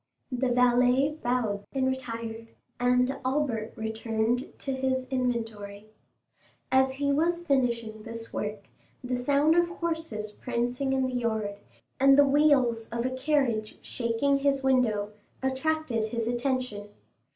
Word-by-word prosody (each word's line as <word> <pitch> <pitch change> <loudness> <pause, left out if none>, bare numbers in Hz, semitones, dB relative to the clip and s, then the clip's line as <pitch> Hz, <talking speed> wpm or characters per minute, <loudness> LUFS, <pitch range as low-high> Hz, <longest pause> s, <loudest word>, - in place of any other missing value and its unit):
The 250 0 0
valet 250 +4 +3
bowed 235 -5 0
and 265 -1 +1
retired, 230 -3 -4 0.3
and 250 +2 +2
Albert 255 -5 -1
returned 220 +2 -1
to 270 - -4
his 260 0 -1
inventory. 225 -5 -3 0.8
As 265 0 +4
he 280 +1 0
was 340 +3 +1
finishing 235 -6 0
this 230 0 -7
work, 210 -1 -4 0.4
the 250 0 -1
sound 285 +5 +3
of 345 0 +3
horses 320 - -4
prancing 245 +4 -2
in 265 -1 +1
the 255 - -3
yard, 220 -4 -2 0.4
and 275 +1 +6
the 285 - +7
wheels 275 -6 +3
of 235 +1 -2
a 255 - 0
carriage 260 -5 0
shaking 240 +4 +1
his 275 -1 +1
window, 225 -6 +2 0.3
attracted 265 -3 0
his 230 0 -3
attention. 240 -4 -2
250 Hz, 130 wpm, -28 LUFS, 225-270 Hz, 0.8 s, the